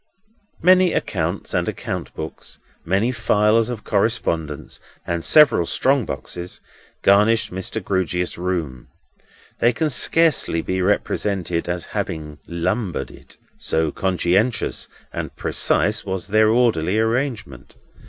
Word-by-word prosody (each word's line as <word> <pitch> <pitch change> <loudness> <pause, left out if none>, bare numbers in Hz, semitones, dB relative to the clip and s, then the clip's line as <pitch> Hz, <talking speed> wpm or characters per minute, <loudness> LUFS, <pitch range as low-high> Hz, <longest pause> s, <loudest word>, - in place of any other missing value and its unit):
Many 185 0 +5
accounts - - -2
and - - 0
account - - -5
books, - - -8 0.3
many 100 +8 +1
files 110 -1 +2
of 120 -4 -5
correspondence, 80 -8 -1 0.3
and 85 -1 -2
several 135 - +5
strong 135 -3 +2
boxes, 90 0 -6 0.4
garnished 105 +1 +4
Mr. 95 +4 -3
Grewgious's 90 -2 -1
room. 85 -8 -3 0.7
They 120 - +4
can 155 +5 -1
scarcely 150 - +2
be 95 0 -2
represented 90 -3 -1
as 85 -1 -3
having 75 -2 -4
lumbered 90 +3 -2
it, - - -15 0.2
so 80 -1 0
conscientious 95 - 0 0.3
and - - -5
precise 105 +2 0
was 95 0 -4
their 110 +1 +4
orderly 110 -6 +2
arrangement. 110 - -2
100 Hz, 115 wpm, -21 LUFS, 85-115 Hz, 0.7 s, Many